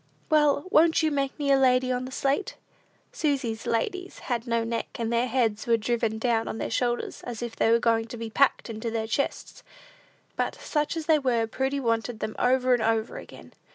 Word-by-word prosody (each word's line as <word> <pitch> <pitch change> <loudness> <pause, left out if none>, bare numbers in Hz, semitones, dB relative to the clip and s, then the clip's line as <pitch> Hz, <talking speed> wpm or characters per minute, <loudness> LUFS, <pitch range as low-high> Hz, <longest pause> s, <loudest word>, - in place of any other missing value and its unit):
Well, 295 -1 +3
won't 320 +1 +4
you 310 - +2
make 275 -2 -1
me 285 -2 0
a 275 - +5
lady 255 -1 +3
on 250 0 -1
the 260 - -8
slate?" 275 +8 -1 0.6
Susy's 265 -7 -2
ladies 370 - -2 0.2
had 235 +1 -3
no 230 -1 +1
necks, 230 0 -3
and 230 0 -1
their 235 +2 +2
heads 230 -4 0
were 230 -1 +4
driven 225 0 -1
down 225 -1 0
on - - -4
their - - -4
shoulders, 240 +1 -1
as 240 -1 -6
if 235 -1 -5
they - - +2
were 230 - +5
going 230 -1 +1
to 235 - -8
be 225 -1 -6
packed 275 +4 +2
into 225 0 -4
their 225 -1 -2
chests; 275 +5 -3 0.7
but, - - -1
such 300 +2 -2
as 320 - -4
they 315 -1 +4
were, 240 -4 +1
Prudy 265 +5 -2
wanted 230 -2 -1
them 215 0 -4
over 255 0 +3
and 245 - +2
over 220 0 0
again. - - -12
240 Hz, 205 wpm, -26 LUFS, 225-275 Hz, 0.7 s, a